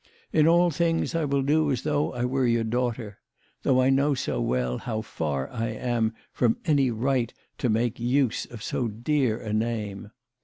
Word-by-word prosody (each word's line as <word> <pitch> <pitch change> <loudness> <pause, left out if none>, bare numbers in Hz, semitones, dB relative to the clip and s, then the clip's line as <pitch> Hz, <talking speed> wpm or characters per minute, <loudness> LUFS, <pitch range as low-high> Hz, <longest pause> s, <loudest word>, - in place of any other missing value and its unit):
In 155 -1 +5
all 175 +1 +5
things 165 +2 0
I 165 -2 0
will 140 -1 +1
do 150 +2 +2
as 125 -2 -1
though 150 -1 0
I 120 0 -1
were 130 0 +1
your 115 -1 +2
daughter 115 -2 -2 0.4
though 130 -1 +3
I 130 - +4
know 140 +2 +3
so 125 - -2
well 60 0 0
how 110 -2 -3
far 70 -8 -3
I 115 -1 -2
am 115 0 -1 0.2
from 115 -2 +2
any 145 -5 +3
right 120 +1 0 0.3
to 125 - +1
make 115 +2 0
use 125 0 +1
of 115 -4 -10
so 125 - -1
dear 120 +2 0
a 110 -3 -4
name 110 -2 -2
120 Hz, 185 wpm, -26 LUFS, 110-140 Hz, 0.4 s, In